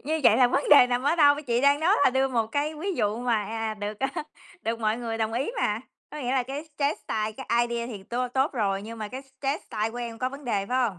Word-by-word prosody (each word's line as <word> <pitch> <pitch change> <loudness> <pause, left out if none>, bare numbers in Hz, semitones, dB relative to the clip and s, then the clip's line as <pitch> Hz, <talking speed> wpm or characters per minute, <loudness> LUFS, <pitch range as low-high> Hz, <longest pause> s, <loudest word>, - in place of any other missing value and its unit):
Như 315 +2 -1
vậy - - +7
là 255 - +6
vấn 275 +3 0
đề 285 -4 +9
nằm 245 0 0
ở 290 +5 +2
đâu? 290 -3 +6
Chị 240 -1 +1
đang 280 +2 +4
nói 355 +6 +4
là - - +6
đưa 265 +1 +2
một 230 -3 0
cái 290 +6 -1
ví 375 +6 -3
dụ 210 -7 0
mà, 235 -4 0
à, 225 +1 -3
được, 210 0 -5
à, 270 - +1 0.5
được 230 +1 -2
mọi 215 0 +1
người 230 -2 -4
đồng 220 0 -1
ý 255 - -1
mà, 210 +1 0 0.3
có 300 - -7
nghĩa 250 -4 -2
là 265 -2 +2
cái 280 +5 -6
chess 285 +1 0
style, 215 0 -2
cái 240 0 0
idea 235 0 -2
thì 215 -5 -7
tố 245 +4 -2
tốt 265 +4 +1
rồi, 200 -6 0
nhưng 225 +2 -8
mà 215 - -4
cái 260 +4 -7 0.2
chess 275 +2 -1
style 215 +1 -2
của 235 - -9
em 235 -2 -5
có 255 +2 0
vấn 280 +2 -10
đề 205 -5 -1
phải 255 +4 0
hông? 185 -5 -10
245 Hz, 280 wpm, -26 LUFS, 220-275 Hz, 0.5 s, đề